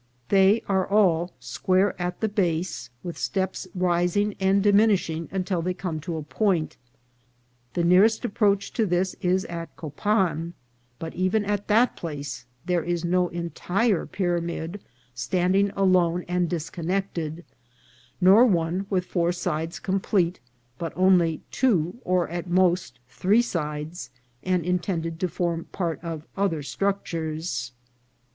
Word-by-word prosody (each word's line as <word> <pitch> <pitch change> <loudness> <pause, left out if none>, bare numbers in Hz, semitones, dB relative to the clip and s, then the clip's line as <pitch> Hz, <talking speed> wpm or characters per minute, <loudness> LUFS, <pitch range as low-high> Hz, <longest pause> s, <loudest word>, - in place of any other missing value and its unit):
They 195 +3 +5
are 190 -2 +1
all 180 -4 +3
square 185 - +1
at 175 0 -3
the 220 - +2
base, 175 - -1
with 175 -2 -6
steps 190 -1 -2
rising 180 +3 +1
and 195 +1 +3
diminishing 200 -6 +3
until 185 -1 -1
they 180 +2 -2
come 180 -4 -4
to 160 +2 -4
a 155 - -4
point. 175 0 0 1.0
The 175 - +1
nearest 200 +7 +4
approach 205 -3 +1
to 220 -3 +1
this 180 +1 +1
is 185 +1 +1
at 170 -1 -7
Copan; 170 +1 -1 0.4
but 160 +4 -6
even 185 +4 +1
at 205 0 -2
that 230 +4 +3
place 140 -6 -6 0.2
there 180 -1 +1
is 175 0 -2
no 180 +1 +2
entire 175 +4 -1
pyramid 175 0 -2 0.3
standing 180 +10 +1
alone 180 -3 +2
and 180 -1 0
disconnected, 170 0 -3 0.7
nor 190 +5 +7
one 180 0 0
with 185 -2 0
four 175 -2 +1
sides 165 -2 -3
complete, 190 -2 0 0.4
but 165 - -4
only 180 -4 +3
two, 195 -6 +1
or, 180 -2 +1
at 175 +1 -5
most, 175 -7 +2
three 205 - +2
sides, 150 - -4 0.3
and 180 -3 0
intended 170 -2 -1
to 185 - +1
form 170 -1 -2
part 170 -6 -3
of 165 -2 -5
other 190 -7 0
structures. 160 -5 -2
180 Hz, 130 wpm, -25 LUFS, 165-195 Hz, 1.0 s, nor